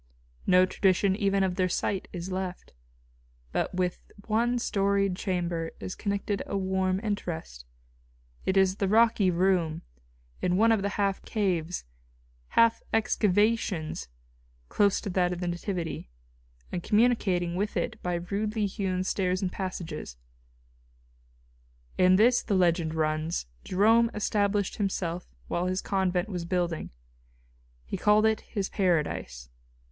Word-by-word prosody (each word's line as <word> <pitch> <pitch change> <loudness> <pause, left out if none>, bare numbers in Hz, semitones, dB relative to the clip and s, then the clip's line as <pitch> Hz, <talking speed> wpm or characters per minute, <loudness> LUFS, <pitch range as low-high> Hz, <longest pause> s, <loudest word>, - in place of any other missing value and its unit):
No 185 0 +6
tradition 190 +1 +2
even 195 -2 +1
of 185 -1 -1
their 185 -1 +2
site 190 +2 -1
is 180 +1 -6
left. 185 -1 -5 0.8
But - - -1
with 180 -1 -1 0.2
one 235 +3 +1
storied 200 -3 +1
chamber 175 -3 -2
is 185 - -5
connected 200 -1 -2
a 200 - -2
warm 190 -1 0
interest. 165 - -4 0.8
It 190 - +1
is 190 0 +3
the 195 - 0
rocky 220 -2 +4
room, 175 -3 +1 0.6
in 180 0 +1
one 225 +2 +5
of 220 -3 +3
the 200 0 -2
half 200 -1 0
caves, 180 - -1 0.7
half 230 0 +5
excavations, 210 - +1 0.6
close 200 -1 +2
to - - -4
that 180 -1 +1
of 175 - -6
the 175 - -3
Nativity, 175 - -4 0.6
and 175 - -3
communicating 205 -6 +2
with 205 +3 -1
it 220 - -3
by 180 -1 -1
rudely 205 +5 -1
hewn 190 -2 -2
stairs 185 0 0
and 185 - -1
passages. 170 - -5 1.8
In 185 0 +6
this, 235 +5 +5
the 205 - -1
legend 170 -3 +2
runs, 155 - -1 0.2
Jerome 225 +5 +4
established 205 -1 0
himself 180 -4 -2 0.2
while 175 +1 -1
his 185 0 0
convent 190 -2 0
was 180 -5 -4
building. 175 -2 -1 1.0
He - - -4
called 210 +1 +4
it 220 0 +2
his 195 -2 -3
paradise. 150 - -1
190 Hz, 130 wpm, -28 LUFS, 175-205 Hz, 1.8 s, No